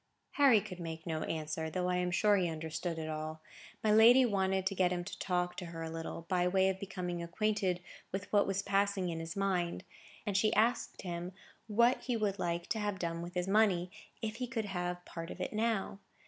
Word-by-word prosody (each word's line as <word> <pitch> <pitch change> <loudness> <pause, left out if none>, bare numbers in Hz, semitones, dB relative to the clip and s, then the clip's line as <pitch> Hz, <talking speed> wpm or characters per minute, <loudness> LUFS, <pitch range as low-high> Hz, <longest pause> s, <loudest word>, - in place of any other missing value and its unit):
Harry 275 -6 +6
could 195 -3 -8
make 165 -1 -6
no 160 -2 -2
answer, 160 0 -3
though 180 +2 -1
I 180 0 +1
am 180 0 0
sure 205 +3 +4
he 180 -3 +1
understood 160 +1 -4
it 160 -1 -4
all. 155 0 -4 0.4
My 215 - +3
lady 235 +4 +8
wanted 190 -3 +1
to 195 - +1
get 185 -2 +2
him 175 -1 -1
to 185 +1 -8
talk 180 -1 0
to 180 - -5
her 165 -1 -6
a 160 - -4
little, 165 0 -5
by 180 0 +2
way 190 +1 +3
of 190 0 -2
becoming 180 -3 -4
acquainted 185 +1 0 0.3
with 190 +1 -3
what 205 -1 +5
was 195 0 0
passing 195 -2 +1
in 165 -1 -3
his 165 0 -5
mind; 185 -3 0 0.4
and 205 -3 -1
she 215 +2 +4
asked 230 +4 +1
him 175 0 -4 0.3
what 235 +4 +3
he 245 -3 -1
would 205 -2 -1
like 170 0 -1
to 220 - 0
have 205 -2 -1
done 170 -2 -3
with 175 +2 -7
his 180 0 0
money, 195 -4 +3 0.3
if 215 0 -2
he 250 0 -3
could 230 -3 -2
have 180 -2 -3
part 165 0 -7
of - - -8
it 185 - -3
now? 215 -3 0
185 Hz, 220 wpm, -33 LUFS, 170-205 Hz, 0.4 s, lady